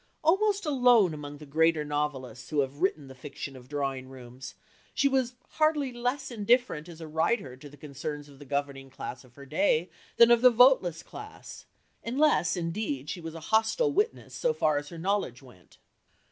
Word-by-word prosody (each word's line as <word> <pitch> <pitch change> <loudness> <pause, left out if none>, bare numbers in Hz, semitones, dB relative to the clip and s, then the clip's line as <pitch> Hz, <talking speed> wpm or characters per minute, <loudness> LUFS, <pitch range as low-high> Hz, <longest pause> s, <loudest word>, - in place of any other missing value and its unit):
Almost 400 +4 +2
alone 245 - +4
among 145 -1 -7
the 150 - -11
greater 160 +1 +2
novelists 140 -5 -3
who 150 -2 +2
have 140 +3 -5
written 155 -7 0
the 135 - -10
fiction 135 +1 -8
of 125 0 -14
drawing 135 -3 -3
rooms, 130 0 -10 0.4
she 280 - +3
was 260 -2 0
hardly 305 -4 +1
less 250 +3 -2
indifferent 220 -7 +1
as 165 -1 -11
a 160 - -7
writer 160 - 0
to 145 +3 -12
the 145 - -16
concerns 145 +1 -6
of 140 -2 -16
the 145 - -11
governing 140 -1 -3
class 130 -1 -7
of 125 -2 -21
her 140 - -12
day 160 +3 +1 0.3
than 235 0 +7
of 235 -1 +5
the 250 - +8
voteless 235 -9 +4
class, 430 +1 -11 0.4
unless, 255 - +2
indeed, 165 -5 -3
she 175 - -6
was 165 0 -7
a - - -6
hostile 225 - +3
witness 425 +4 -1
so 485 -1 0
far 150 -2 +2
as 145 0 -10
her 170 - -9
knowledge 175 -8 -2
went. 120 -9 -18
160 Hz, 185 wpm, -28 LUFS, -, 0.4 s, the